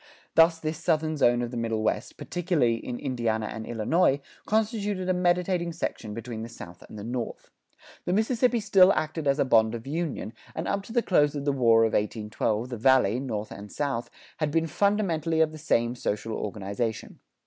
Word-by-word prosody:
Thus 165 0 +5
this 155 0 -3
Southern 160 -2 +1
zone 120 -4 +3
of 120 - -4
the 125 - -5
Middle 115 -1 -1
West, - - -1
particularly 160 -10 0
in 120 - -4
Indiana 115 -5 -1
and 110 0 -6
Illinois, 135 +6 +2 0.3
constituted 210 -3 0
a 185 - +3
mediating 180 -1 +1
section 110 -9 -4
between 115 -1 -6
the 115 - -6
South 90 -6 -11
and - - -10
the 100 - -7
North. 120 +1 -5 0.5
The 175 - 0
Mississippi 235 +3 +2
still 195 -2 +6
acted 155 -1 -2
as 140 0 +3
a 140 - +2
bond 110 -2 +4
of 115 - -7
union, 145 - -3 0.2
and 160 - -3
up 200 - 0
to - - -10
the 240 0 +2
close 150 -5 +3
of 140 -1 -4
the 145 - +3
War 115 -4 +4
of 115 - +1
1812 110 +2 -1
the 120 - -4
Valley, 125 -2 +4
north 110 -6 -4
and 100 +1 -9
south, 140 -5 -2 0.3
had 155 -2 0
been 165 +2 +1
fundamentally 170 -2 +1
of 160 -1 +3
the 155 - -10
same 120 -5 +1
social 115 -2 -3
organization. 105 +2 -4
140 Hz, 190 wpm, -27 LUFS, 115-170 Hz, 0.5 s, still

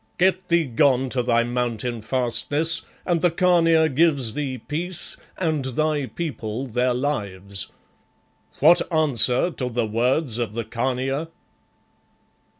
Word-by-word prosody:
Get 185 +1 +1
thee 170 0 +3
gone 130 0 +2
to 125 0 0
thy 120 -1 +2
Mountain 120 -1 -2
fastness 145 +8 0 0.2
and 170 -3 0
the 175 - +4
Khania 165 -2 +3
gives 140 -6 +2
thee 135 -2 -3
peace, 165 +7 -2 0.2
and 160 -6 -1
thy 145 +2 -1
people 125 -7 -5
their 125 0 0
lives. 100 - -3 0.9
What 165 +5 +6
answer 140 -1 +3
to 125 -6 -4
the 120 -1 -1
words 120 +3 0
of 115 -3 -2
the 115 +1 -3
Khania?" 130 +6 -2
130 Hz, 125 wpm, -23 LUFS, 120-160 Hz, 0.9 s, What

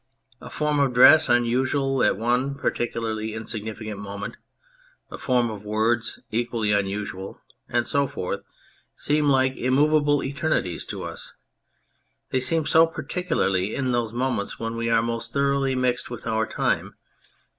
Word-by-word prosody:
A - - -9
form 150 -1 0
of 135 -3 +1
dress 155 +4 +7
unusual 130 +3 +1
at - - +3
one 125 +5 0
particularly 110 -4 -2
insignificant 110 -1 -6
moment, 100 0 -6 0.8
a - - -6
form 125 -3 +1
of 105 -2 -8
words 110 +2 0
equally 115 -2 -1
unusual, 100 -1 -2 0.3
and 120 0 +1
so 140 -1 +1
forth, 90 - -4 0.5
seem 150 0 +1
like 130 -1 +3
immovable 145 +3 +3
eternities 140 - -1
to - - -6
us; - - -7 1.0
they 130 - +2
seem 160 +4 +1
so 165 +1 +5
particularly 155 - -1
in 130 -2 -1
those 120 -2 0
moments 120 -3 -2
when 115 0 -3
we 115 0 -2
are 115 -1 +3
most 115 0 -3
thoroughly 140 -1 +1
mixed 125 -1 0
with 120 -2 -8
our 110 -1 0
time. - - -1
120 Hz, 140 wpm, -24 LUFS, 110-140 Hz, 1.0 s, dress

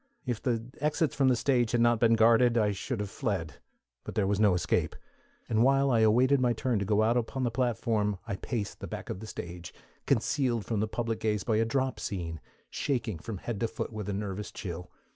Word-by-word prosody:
_" - - -43 0.2
If 120 -4 -2
the 115 -3 0 0.2
exits 150 0 +1
from 135 -1 +2
the 130 - +5
stage 120 -2 +1
had 120 - +3
not 120 -1 +4
been 115 -1 +5
guarded, 115 +2 +5
I 105 -2 +3
should 110 +4 -4
have 100 -1 -5
fled; 95 - -3 0.5
but - - -7
there 105 - +2
was 100 +1 0
no 105 -4 +5
escape, 90 - 0 0.5
and 110 0 +2
while 135 +2 +4
I 115 - +3
awaited 125 +5 +4
my 120 -1 +3
turn 120 -1 0
to 100 - -2
go 105 +2 +3
out 115 +2 +3
upon 125 +3 -2
the 120 - 0
platform 115 -4 0
I 100 - -3
paced 110 -2 -4
the - - -6
back - - -6
of - - -5
the 110 - -8
stage, 85 -3 -7 0.3
concealed 120 -6 +1
from 110 -3 -1
the 110 - +1
public 115 0 -2
gaze 105 -2 0
by 110 -3 +1
a 115 - +3
drop 130 +3 -1
scene, 85 -6 -4 0.3
shaking 120 - -2
from 105 +4 -6
head 110 +3 -5
to 115 - +1
foot 115 0 -5
with 105 -2 -5
a - - -1
nervous 100 0 -4
chill. 90 -1 -6
115 Hz, 225 wpm, -29 LUFS, 105-120 Hz, 0.5 s, the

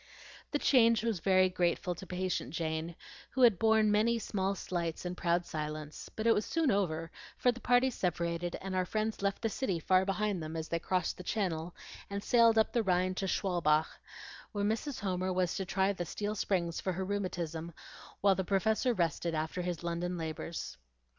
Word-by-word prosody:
The 290 - 0
change 230 -6 +4
was 225 -6 0
very 185 +1 +4
grateful 180 0 0
to 185 +2 -10
patient 185 +1 -2
Jane, 160 0 -2 0.3
who 260 - +1
had 230 -7 +6
borne 220 -1 +4
many 225 +3 +3
small 200 -3 -1
slights 170 -3 -3
in 180 - -2
proud 175 0 0
silence; 150 -1 -5
but 220 - -3
it 230 - +6
was 210 - +1
soon 320 0 +1
over, 165 -5 -1 0.3
for 245 - +3
the 245 - -9
parties 245 +1 +3
separated, 170 -1 -1
and 190 0 -4
our 185 - +2
friends 215 +1 -2
left 200 +2 -1
the - - +3
city 200 -6 -1
far 185 +3 +3
behind 200 -1 -1
them, 155 +1 -5
as 160 0 -4
they 170 - 0
crossed 180 0 -1
the 180 - -8
channel, 175 -4 -2 0.3
and 200 0 -4
sailed 230 -2 +5
up 220 - +3
the 235 - +3
Rhine 185 -2 +1
to 195 +1 -2
Schwalbach, 170 -5 +2 0.7
where 205 -1 0
Mrs. 225 +5 -2
Homer 185 -1 -1
was 180 -1 +1
to 190 - -2
try 190 +2 +1
the 180 - -3
steel 205 +5 -3
springs 180 -5 -1
for 185 - -1
her 190 +2 -3
rheumatism 175 -4 -3 0.5
while 200 -1 +5
the 190 - -1
Professor 215 +6 +1
rested 170 -1 0
after 160 +3 -2
his 175 -2 -3
London 175 +1 -2
labors. 160 - -5
185 Hz, 190 wpm, -32 LUFS, 170-210 Hz, 0.7 s, had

